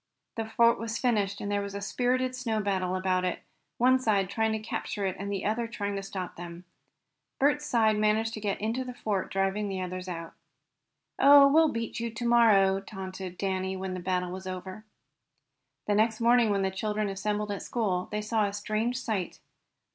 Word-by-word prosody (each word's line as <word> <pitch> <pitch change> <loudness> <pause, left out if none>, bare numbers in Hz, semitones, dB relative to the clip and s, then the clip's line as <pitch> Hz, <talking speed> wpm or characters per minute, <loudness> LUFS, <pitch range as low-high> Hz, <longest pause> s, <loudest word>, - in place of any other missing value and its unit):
The 225 - -2
fort 230 +1 +3
was 230 0 -3
finished, 205 -5 0
and 205 - -3
there 205 0 +1
was 200 0 -6
a - - -3
spirited 255 +4 0
snow 230 -4 -1
battle 190 -3 -1
about 185 -1 0
it, 180 - -2 0.3
one 255 +2 +4
side 200 -6 +1
trying 220 +1 +1
to - - 0
capture 215 -1 -4
it 190 - -1
and 200 +1 -4
the 195 - -3
other 230 +2 0
trying 205 -3 -3
to 195 - -3
stop 190 -2 -6
them. 175 0 -8 0.7
Bert's 295 +2 +2
side 220 -3 +3
managed 215 +1 +2
to 215 - -5
get 205 -2 -2
into 225 +5 -1
the 250 -1 -8
fort, 205 -5 -2
driving 195 +2 0
the 190 -1 -3
others 185 0 -5
out. 165 -2 -6 0.9
"Oh, 280 0 +8
we'll 320 +1 +6
beat 230 0 -4
you 235 0 -2
to 235 +2 -6
morrow!" 205 -5 +5
taunted 190 -2 -7
Danny, 190 -1 -2
when 190 0 -4
the 185 - -4
battle 180 0 -1
was 190 +1 -7
over. 185 +3 -7 1.0
The 205 - +1
next 220 +1 +2
morning, 235 -1 +4
when 200 -1 +1
the 190 - 0
children 210 +2 -2
assembled 205 +2 -2
at 200 - -4
school, 190 -7 -1
they 210 0 -3
saw 215 0 +1
a 200 - -5
strange 215 +4 -1
sight. 210 -9 -3
205 Hz, 195 wpm, -28 LUFS, 190-230 Hz, 1.0 s, Oh